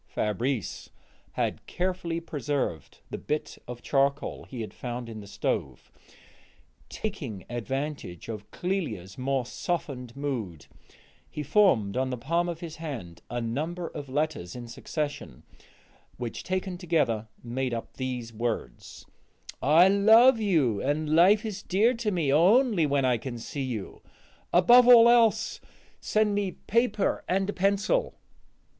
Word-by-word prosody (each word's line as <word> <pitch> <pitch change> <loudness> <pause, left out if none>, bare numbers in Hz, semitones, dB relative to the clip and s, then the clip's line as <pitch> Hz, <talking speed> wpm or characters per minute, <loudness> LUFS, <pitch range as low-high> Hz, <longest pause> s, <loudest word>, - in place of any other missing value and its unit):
Fabrice 115 +2 -2 0.4
had - - -2
carefully 180 -2 -2
preserved 145 - -3
the - - -4
bit 150 0 -3
of 120 0 -8
charcoal 140 +1 0
he 125 -3 -7
had 110 - -6
found 120 -1 -5
in 110 -1 -7
the 100 - -10
stove; - - -3 1.0
taking 130 - -5
advantage 130 - -4
of 105 -2 -7
Clélia's 125 - -4
more 135 -1 0
softened 135 -5 -4
mood, 115 - -4 0.6
he 150 - -5
formed 135 - +3
on 130 0 0
the 125 - -3
palm 170 +8 0
of 170 -1 -5
his 165 -2 -7
hand 130 - -7
a 120 - -2
number 155 +10 -3
of 140 -2 -8
letters 145 - -2
in 120 -1 -7
succession, 145 - -5 0.7
which 120 -2 -5
taken 185 -1 -3
together 150 - 0 0.2
made 125 +2 -2
up 115 -1 -5
these 125 -3 -4
words: 115 +1 -4 0.6
"I 160 +6 +6
love 220 +5 +6
you, 155 - +2
and 150 +2 0
life 200 +6 +5
is 210 -2 -4
dear 215 +7 +2
to 230 -3 -2
me 165 -8 +1
only 195 - +4
when 140 -1 +1
I 125 -2 +2
can 120 0 -6
see 130 +5 -6
you. 120 -7 -5 0.5
Above 240 +8 +7
all 235 -2 +9
else, 225 -2 +3 0.4
send 215 -1 +1
me 200 -3 -1
paper 230 -2 0
and 190 +1 +1
a - - -11
pencil." 200 - +1
145 Hz, 140 wpm, -27 LUFS, 120-185 Hz, 1.0 s, all